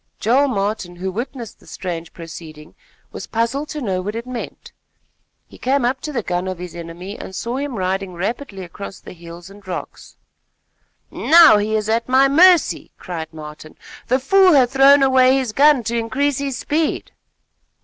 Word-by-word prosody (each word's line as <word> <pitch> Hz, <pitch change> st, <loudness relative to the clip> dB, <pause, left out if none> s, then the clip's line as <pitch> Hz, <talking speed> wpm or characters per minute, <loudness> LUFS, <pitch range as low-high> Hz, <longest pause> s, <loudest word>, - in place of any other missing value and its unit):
Joel 260 Hz, +6 st, +2 dB
Martin, 200 Hz, -6 st, -3 dB
who 190 Hz, +2 st, -4 dB
witnessed 240 Hz, +2 st, -6 dB
the -, -, -21 dB
strange 170 Hz, -3 st, -6 dB
proceeding, 160 Hz, -2 st, -11 dB, 0.4 s
was -, -, -8 dB
puzzled 235 Hz, +6 st, -2 dB
to 300 Hz, -, -5 dB
know 190 Hz, -6 st, -2 dB
what 205 Hz, +4 st, -5 dB
it 230 Hz, +1 st, -5 dB
meant. 255 Hz, -1 st, -8 dB, 0.7 s
He -, -, -17 dB
came 265 Hz, 0 st, +1 dB
up 260 Hz, +2 st, -1 dB
to 305 Hz, -, -5 dB
the 240 Hz, -6 st, -3 dB
gun 180 Hz, 0 st, -2 dB
of 185 Hz, -1 st, -4 dB
his 180 Hz, -1 st, -8 dB
enemy 175 Hz, +4 st, -8 dB
and 190 Hz, -, -8 dB
saw 235 Hz, +6 st, -3 dB
him 280 Hz, -2 st, -4 dB
riding 190 Hz, -1 st, -2 dB
rapidly 200 Hz, +2 st, -4 dB
across 190 Hz, +2 st, -9 dB
the -, -, -12 dB
hills 170 Hz, +1 st, -12 dB
and 205 Hz, +1 st, -15 dB
rocks. 180 Hz, -, -8 dB, 0.9 s
"Now 325 Hz, -9 st, +6 dB
he 215 Hz, +1 st, -1 dB
is 215 Hz, -1 st, -1 dB
at 230 Hz, +2 st, -1 dB
my 265 Hz, +2 st, +5 dB
mercy," 345 Hz, +5 st, +4 dB
cried 165 Hz, -4 st, -7 dB
Martin. 155 Hz, 0 st, -11 dB, 0.3 s
"The 255 Hz, -, +2 dB
fool 375 Hz, +7 st, +4 dB
hath 255 Hz, -3 st, +4 dB
thrown 275 Hz, +1 st, +6 dB
away 260 Hz, 0 st, +4 dB
his 255 Hz, -5 st, -2 dB
gun 285 Hz, -1 st, +4 dB
to 235 Hz, +2 st, -3 dB
increase 260 Hz, +5 st, -1 dB
his 275 Hz, -2 st, -3 dB
speed." 310 Hz, +3 st, -2 dB
225 Hz, 175 wpm, -19 LUFS, 185-270 Hz, 0.9 s, Now